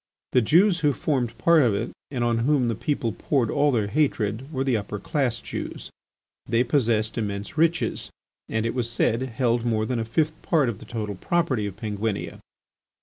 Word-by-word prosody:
The 125 - +4
Jews 175 - +4
who 150 -2 +2
formed 125 -5 -1
part 170 -2 +5
of 115 -6 +3
it 115 +4 -2 0.2
and 125 -4 -2
on 120 -1 +1
whom 130 0 +2
the - - +1
people 120 0 -1
poured 120 +1 0
all 145 0 +3
their 110 -5 +1
hatred 120 0 0
were 135 -3 -1
the 130 -3 +1
upper 105 0 -3
class 120 +2 -1
Jews. - - -6 0.6
They 115 +2 +3
possessed 115 -4 +1
immense 100 +2 -4
riches 165 +1 +1 0.4
and, 110 0 -1
it 115 - -1
was 120 -2 -1
said, 115 0 +1
held 120 -2 0
more 110 -2 +1
than 125 0 -1
a 115 - -2
fifth 155 +7 -1
part 150 -7 +2
of 110 - -5
the - - -11
total 105 -3 -4
property 130 - 0
of 100 - -7
Penguinia. 105 -1 -3
120 Hz, 190 wpm, -25 LUFS, 110-140 Hz, 0.6 s, part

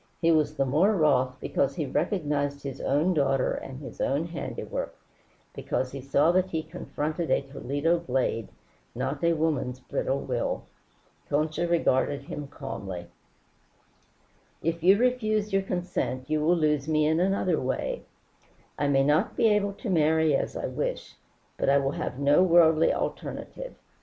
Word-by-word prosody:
He 165 -1 +3
was 155 -1 +2
the 135 - +1
more 160 +11 +3
wroth 130 -6 +2
because 140 +1 0
he 155 - -2
recognized 145 -2 -1
his 135 -2 -6
own 150 +7 +2
daughter 135 -4 +1
and 130 0 -7
his 130 -6 -8
own 140 +4 +1
handiwork, 170 -1 -5 0.6
because 130 -1 -2
he 135 - -6
saw 140 +4 +3
that 185 +1 +2
he 160 -3 -2
confronted 160 -1 -4
a 130 - +2
Toledo 145 +5 -1
blade, 125 -7 -1 0.5
not 135 +4 -3
a 170 0 +4
woman's 150 -6 -1
brittle 135 +1 -2
will. 125 -2 -2 0.7
Concha 155 +3 0
regarded 145 -4 +1
him 145 0 -6
calmly. 95 -10 -7 1.5
"If 165 +1 -1
you 190 +4 +6
refuse 215 -4 +1
your 195 - +3
consent 175 -9 -3
you 155 0 +1
will 175 +3 +3
lose 150 -3 +1
me 155 -1 +2
in 160 +2 +2
another 185 -2 +1
way. 130 - -2 0.8
I 145 - +1
may 135 -1 +3
not 150 +2 +1
be 225 - +4
able 205 -1 +1
to 220 +3 -6
marry 160 -2 +3
as - - -2
I - - -3
wish, - - -3 0.4
but - - +1
I 140 - +5
will 135 -1 +1
have 130 - -4
no 145 +4 +4
worldly 165 -3 +5
alternative. - - -5
155 Hz, 155 wpm, -27 LUFS, 140-170 Hz, 1.5 s, you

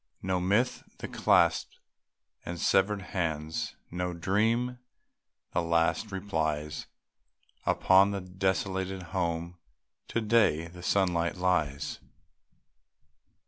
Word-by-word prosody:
No 95 -1 0
myth, 105 +8 +1 0.2
the - - -6
clasped - - +2 0.7
and 85 0 -5
severed 100 +2 +2
hands, 80 -4 -2 0.2
No 90 0 -2
dream, 115 +8 +1 0.7
the - - +2
last 85 +5 +1
replies. 80 -6 -2 0.8
Upon 95 +1 +5
the 100 -1 -2
desolated 95 0 -2
home 85 -1 -2 0.5
To - - -1
day, 105 -8 +3
the 90 +1 -11
sunlight 90 -3 +1
lies. 80 -6 0
90 Hz, 95 wpm, -29 LUFS, 85-100 Hz, 0.8 s, Upon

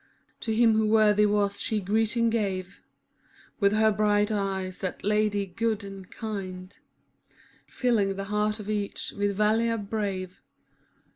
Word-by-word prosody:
To 225 - -3
him 225 0 +4
who 220 0 +2
worthy 210 -1 +4
was 205 -1 0
she 220 - 0
greeting 225 +4 +1
gave 195 -4 -2 0.8
With 200 -2 +4
her 220 0 +4
bright 210 0 +2
eyes, 190 -3 -2
that 185 - -4
Lady 210 -1 +1
good 220 +3 -2
and 195 -2 -9
kind, 190 -4 -6 0.5
i» - - -34 0.3
Filling 215 -6 +1
the 195 - -4
heart 210 +1 -1
of 210 - -8
each 210 -2 -3
with 205 0 0
valour 225 +2 +2
brave. 200 -3 -4
210 Hz, 140 wpm, -27 LUFS, 195-220 Hz, 0.8 s, him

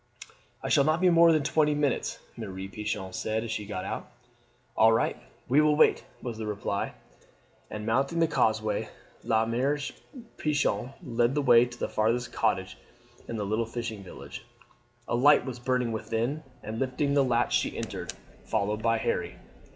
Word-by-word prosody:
"I - - -2
shall 140 - +5
not 155 +3 +2
be 180 -1 +4
more 170 0 +7
than 155 -2 +2
twenty 150 +1 +2
minutes," 145 -2 0 0.2
Mere 110 -4 -6 0.2
Pichon 100 -2 -4
said 110 +3 -1
as 115 - -5
she 105 -2 -3
got 95 -3 -4
out. - - -5 0.7
"All 110 +1 +6
right, 115 - +2 0.3
we 140 +5 +5
will 150 -1 +4
wait!" - - +4 0.2
was 115 -3 -5
the 110 - -4
reply, 100 -1 -2 0.8
and 105 0 -6
mounting 135 +8 +1
the 165 - +4
causeway 110 -7 0 0.3
La 110 -1 +2
Mere 130 +6 +1 0.6
Pichon 140 -5 0
led 120 -1 +1
the 145 - +1
way 120 -2 +7
to 120 0 -11
the - - -2
farthest 115 +2 0
cottage 95 -4 0 0.5
in 115 - -4
the 105 -2 -2
little 110 +3 0
fishing 115 -3 -5
village. 95 - -9 0.6
A - - -2
light 145 +5 +5
was 125 -2 -5
burning 125 -1 0
within, 115 +6 -2 0.2
and 110 +1 -5
lifting 135 +2 0
the 140 -1 +4
latch 120 -2 +2
she - - 0
entered, - - -4 0.3
followed 105 0 -1
by 115 0 +2
Harry. - - -2
120 Hz, 170 wpm, -28 LUFS, 110-140 Hz, 0.8 s, more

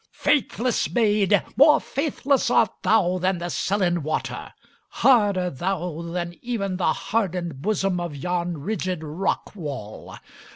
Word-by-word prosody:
"Faithless 255 -4 +1
maid, 210 -4 +2
more 300 +5 +6
faithless 280 -2 0
art 225 -4 +3
thou 185 -4 +2
than 185 +1 +1
the 175 +1 -4
sullen 185 -4 0
water! 155 +1 -3 0.4
Harder 205 -8 +3
thou 175 +2 -3
than 175 0 -4
even 200 -6 -2
the 185 - +2
hardened 180 -8 -2
bosom 195 -2 0
of 170 -4 -4
yon 175 +3 -2
rigid 185 +1 -3
rockwall! 150 - -4
185 Hz, 120 wpm, -24 LUFS, 170-215 Hz, 0.4 s, more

